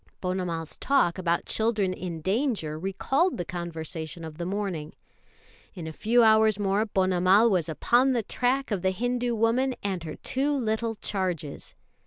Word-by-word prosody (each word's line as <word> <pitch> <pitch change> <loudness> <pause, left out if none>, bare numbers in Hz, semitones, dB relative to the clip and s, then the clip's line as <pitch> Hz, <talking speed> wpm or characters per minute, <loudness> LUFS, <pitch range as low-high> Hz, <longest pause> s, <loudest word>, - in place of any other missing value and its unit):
Ponnamal's 180 -3 -3
talk 250 -10 +2
about 170 -2 0
children 215 -4 +1
in 175 -3 -6
danger 195 - -1
recalled 265 - 0
the 175 - -3
conversation 165 -1 -6
of 160 0 -9
the 170 - -3
morning. 185 -6 -3 0.8
In 175 -4 -7
a 160 - -6
few 235 +7 +3
hours 220 -1 +5
more 205 +2 +1
Ponnamal 190 +3 +4
was 175 -4 +1
upon 245 - +3
the 235 -3 0
track 255 +4 0
of 200 -4 0
the 190 - +2
Hindu 245 +4 -1
woman 240 +4 +1
and 190 -4 -2
her 155 -2 -6
two 285 +2 -1
little 225 -1 -1
charges. 180 -8 -3
195 Hz, 155 wpm, -27 LUFS, 170-230 Hz, 0.8 s, hours